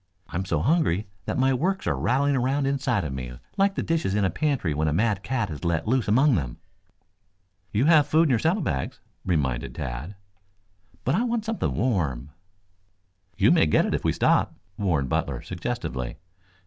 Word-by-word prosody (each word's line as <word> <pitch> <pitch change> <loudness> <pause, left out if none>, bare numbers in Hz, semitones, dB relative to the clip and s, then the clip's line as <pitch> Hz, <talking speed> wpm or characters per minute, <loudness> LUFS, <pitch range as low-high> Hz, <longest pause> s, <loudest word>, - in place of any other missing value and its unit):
I'm 95 +2 -3
so - - 0
hungry 140 - +2 0.2
that - - -2
my 130 +1 +3
works 185 +9 -1
are - - +1
rattling 140 +3 +1
around 135 +2 +1
inside 135 -6 0
of 75 -4 -4
me 65 -2 -5 0.2
like 195 0 +2
the - - -1
dishes 160 - 0
in 105 -2 +2
a 95 - +1
pantry 130 - 0
when 75 +2 0
a 75 - +1
mad 105 +2 +1
cat 115 -5 -2
is 75 - -7
let 85 +2 0
loose 125 0 +1
among 130 +7 +4
them." 65 - -2 1.1
"You 110 +6 +2
have 155 -3 +5
food 160 +3 +4
in 155 - +2
your 120 - +3
saddle 170 - +1
bags," 65 - -3 0.2
reminded 70 -9 -1
Tad. 65 +12 -5 0.9
"But 130 - +1
I 190 - +2
want 235 -3 -1
something 225 0 -1
warm." 75 - -1 1.1
"You - - +5
may 80 - +4
get 75 - +3
it - - -1
if - - -1
you - - +2
stop," - - +2 0.2
warned 85 -10 0
Butler - - -2
suggestively. 85 - -4
110 Hz, 185 wpm, -25 LUFS, -, 1.1 s, have